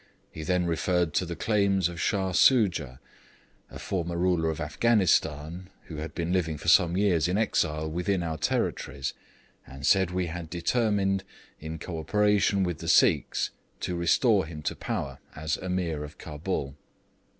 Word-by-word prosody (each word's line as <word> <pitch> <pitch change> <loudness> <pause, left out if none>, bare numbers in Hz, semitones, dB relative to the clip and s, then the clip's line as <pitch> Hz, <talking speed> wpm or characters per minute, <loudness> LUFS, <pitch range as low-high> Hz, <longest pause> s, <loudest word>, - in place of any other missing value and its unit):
He 80 - -8
then 90 +2 0
referred 85 0 0
to 90 - 0
the 85 - -4
claims 100 -3 +2
of 85 -1 -6
Shah 95 -3 0
Soojah, 90 - +3 0.7
a - - -9
former 85 -2 -3
ruler 85 -2 +1
of 80 - -3
Afghanistan 85 -2 +1
(who 80 - -9
had 75 +1 -6
been 85 0 -1
living 80 -4 0
for 85 - -1
some 85 +1 +5
years 90 -5 +2
in 90 +2 0
exile 80 -8 0
within 90 +3 -1
our 80 -2 -3
territories) 70 -2 -2 0.5
and 70 +1 -8
said 95 +1 +4
we 90 0 -1
had 85 -1 -6
determined, 95 +1 0 0.4
in 80 +1 -6
co 85 0 -6
operation 100 +3 +2
with 90 -3 -2
the 85 - -7
Sikhs, 80 - +3 0.3
to 90 - -2
restore 95 +3 +3
him 75 -2 -8
to - - -2
power - - -4 0.2
as 75 -1 -2
Ameer 90 -5 -2
of 75 0 -10
Cabul. 75 -3 -4
85 Hz, 160 wpm, -27 LUFS, 80-95 Hz, 0.7 s, some